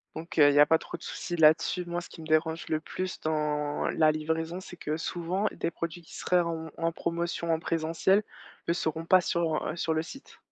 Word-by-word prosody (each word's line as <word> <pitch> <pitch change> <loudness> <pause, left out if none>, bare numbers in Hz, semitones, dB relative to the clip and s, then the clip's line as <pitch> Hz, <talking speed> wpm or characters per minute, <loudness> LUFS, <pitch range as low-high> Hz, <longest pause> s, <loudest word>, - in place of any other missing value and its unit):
Donc 165 +1 -7
heu, 145 -1 +8
il - - +3
y 145 - +6
a 145 - +9
pas 160 - +5
trop - - -8
de - - -26
souci 175 - -4
là-dessus. 160 +3 +4
Moi, 175 0 -2
ce - - -11
qui 165 - -11
me 155 - -9
dérange 160 +1 +1
le 155 - 0
plus 185 +3 -5
dans 150 -1 -1
la 155 -1 +4
livraison, 160 +3 -2
c'est 180 -1 -11
que, 150 -1 -2
souvent, 180 +5 -1
des 170 - -3
produits 170 +1 -5
qui - - -13
seraient 180 -1 +2
en 165 -1 -3
en 165 0 0
promotion 170 0 -2
en 160 - 0
présentiel 165 +5 +1 0.4
ne 170 - +3
seront 160 -1 -2
pas 185 +2 +6
sur, 165 -3 0
heu, 155 - -2
sur 165 -1 0
le 160 0 0
site. 270 - -12
165 Hz, 230 wpm, -29 LUFS, 155-175 Hz, 0.4 s, a